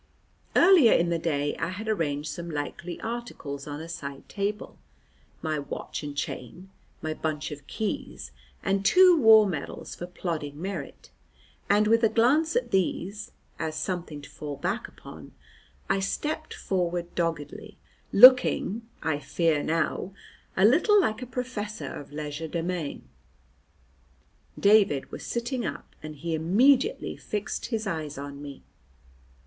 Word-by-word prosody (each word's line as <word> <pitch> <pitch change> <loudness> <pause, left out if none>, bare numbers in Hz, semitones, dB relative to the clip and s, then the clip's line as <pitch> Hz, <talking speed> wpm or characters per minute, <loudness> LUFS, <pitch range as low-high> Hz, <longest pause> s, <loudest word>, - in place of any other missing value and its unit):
Earlier 340 -10 +7
in 170 0 +3
the 170 - 0
day 145 -3 -1
I - - -1
had 205 +4 -6
arranged 150 -8 -1
some 170 +2 -6
likely 160 +3 -5
articles 220 - -6
on 145 0 -5
a 160 - -7
side 140 -5 -7
table: 205 +1 -4 0.6
my 155 -2 -1
watch 140 - -6
and 145 -1 -7
chain, 175 +7 -6 0.3
my 155 0 -1
bunch 155 -1 -3
of 145 -1 -9
keys, 65 - -4 0.3
and 195 0 0
two 360 - +7
war 220 -2 +8
medals 160 -8 -5
for 175 - -7
plodding 155 -5 -4
merit, 175 -5 -6 0.6
and 205 +1 +4
with 230 +2 +3
a 225 - +5
glance 285 - +3
at - - 0
these 195 +2 -1 0.3
(as 160 -1 -3
something 155 -2 -4
to - - -11
fall 145 -2 -6
back 185 - -2
upon), - - -13 0.5
I 195 - +1
stepped 305 +10 -3
forward 175 -2 -2
doggedly, 165 -4 -3 0.3
looking 250 -2 +7 0.2
(I 155 -2 0
fear 160 -1 +1
now) 165 +4 -1 0.4
a 190 - +5
little 350 - +5
like 220 - 0
a 250 - -6
professor 215 - -5
of 145 - -9
legerdemain. 160 +2 -4 1.6
David 200 -9 +4
was - - -7
sitting 240 +1 -2
up, - - -6
and 155 0 -8
he 165 +3 -4
immediately 250 - +3
fixed 210 -1 -4
his 225 -2 -2
eyes 155 -6 -4
on 140 0 -7
me. 140 -1 -9
175 Hz, 140 wpm, -27 LUFS, 150-220 Hz, 1.6 s, war